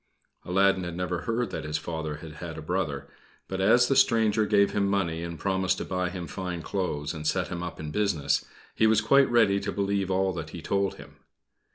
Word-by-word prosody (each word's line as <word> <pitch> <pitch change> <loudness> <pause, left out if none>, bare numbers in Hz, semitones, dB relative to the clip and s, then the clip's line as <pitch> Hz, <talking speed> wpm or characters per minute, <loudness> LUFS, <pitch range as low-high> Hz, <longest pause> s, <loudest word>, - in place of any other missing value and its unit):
Aladdin 95 +1 +3
had 85 -1 -5
never 90 -1 -2
heard 115 +2 -1
that - - -4
his 75 0 -2
father 80 -1 -4
had 75 +1 -9
had 80 -2 -7
a - - -6
brother; 80 -4 -2 0.4
but 95 0 -3
as 120 +5 +5
the 135 - +2
stranger 110 -5 +3
gave 100 -1 +4
him 100 -1 +1
money 90 -5 0
and 85 -1 -5
promised 95 0 0
to - - -4
buy 90 -1 -1
him 90 -1 -6
fine 90 -2 -5
clothes 75 -7 -2
and 75 -1 -4
set 90 +1 0
him 90 -2 -4
up 90 -1 -6
in 75 -1 -5
business, 85 -8 +1 0.3
he 110 - +3
was 110 -1 +4
quite 135 +5 +4
ready 110 -5 +4
to - - -3
believe 100 -1 -1
all 95 0 +1
that 80 -3 -5
he 85 - -8
told 100 -1 0
him. 70 0 -14
95 Hz, 215 wpm, -27 LUFS, 85-100 Hz, 0.4 s, as